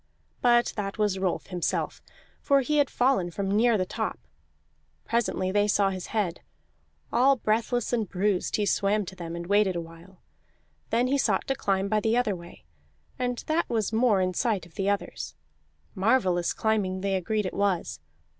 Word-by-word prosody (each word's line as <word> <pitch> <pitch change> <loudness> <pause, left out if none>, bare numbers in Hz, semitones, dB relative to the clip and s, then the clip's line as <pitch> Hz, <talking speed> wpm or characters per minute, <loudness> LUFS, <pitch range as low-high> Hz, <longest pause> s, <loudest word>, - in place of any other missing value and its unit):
But 240 -1 +4
that 195 -1 -3
was 205 -3 +1
Rolf 190 -2 -1
himself, 180 -3 -2 0.4
for 280 -1 +3
he 300 +4 0
had 285 - +3
fallen 245 -8 +2
from 195 +3 -3
near 230 +1 +4
the 185 - 0
top; - - -3 0.9
presently 220 -5 0
they 205 +1 +2
saw 200 -1 +2
his 185 -1 -5
head. 200 -6 -2 0.7
All 270 +3 +5
breathless 235 +1 0
and 220 -5 0
bruised, 195 0 0
he 210 - +1
swam 205 +1 +1
to 190 - -9
them 170 -2 -6
and 170 0 -5
waited 200 0 +2
a - - -1
while; 165 +3 -12 0.7
then 235 +2 +2
he 275 +2 +1
sought - - +1
to - - +3
climb 195 -4 0
by 215 +1 +2
the 220 +3 +1
other 220 -5 +1
way, 170 - -13 0.5
and 245 -1 -2
that 320 +2 0
was 220 -2 -1
more 220 -4 +3
in 185 0 0
sight 210 -3 0
of 170 - -18
the 195 0 -1
others; 200 0 -3 0.6
marvellous 190 -4 +2
climbing 200 -4 0
they 195 0 -1
agreed 205 +3 0
it 185 - -3
was. 195 - -1
205 Hz, 175 wpm, -27 LUFS, 185-230 Hz, 0.9 s, All